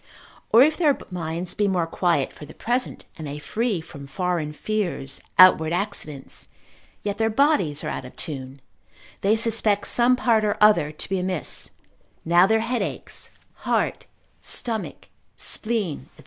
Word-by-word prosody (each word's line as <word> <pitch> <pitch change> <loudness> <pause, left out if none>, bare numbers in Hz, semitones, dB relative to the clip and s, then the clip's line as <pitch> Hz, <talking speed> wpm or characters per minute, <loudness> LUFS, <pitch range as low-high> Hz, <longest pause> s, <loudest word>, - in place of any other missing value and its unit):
Or 235 +3 +8
if 310 +2 +2
their 300 -5 +3
minds 170 0 -3
be 205 - 0
more 180 -3 +1
quiet 165 -4 0
for 150 - -11
the 155 - -13
present, 245 +2 -2
and 155 - -6
they 145 +1 -5
free 215 +4 -2
from 140 -3 -11
foreign 175 -1 -2
fears, 175 -5 -3 0.2
outward 170 -3 +7
accidents, 175 -7 -5 0.6
yet 205 0 -3
their 225 0 +2
bodies 225 - +1
are - - -3
out - - -4
of 130 - -12
tune, 135 -2 -6 0.6
they 205 +3 +3
suspect 220 -2 +2
some 245 +1 +3
part 230 -3 +2
or 210 -1 0
other 210 -8 +4
to 155 - -8
be 190 -1 -1
amiss, 180 -2 +1 0.6
now 175 +3 +5
their 220 +1 +2
head 240 +2 -1
aches, - - -5 0.3
heart, - - -1 0.3
stomach, 225 -4 -4 0.3
spleen, 215 -9 +1
&c. - - -26
190 Hz, 155 wpm, -23 LUFS, 160-225 Hz, 0.6 s, Or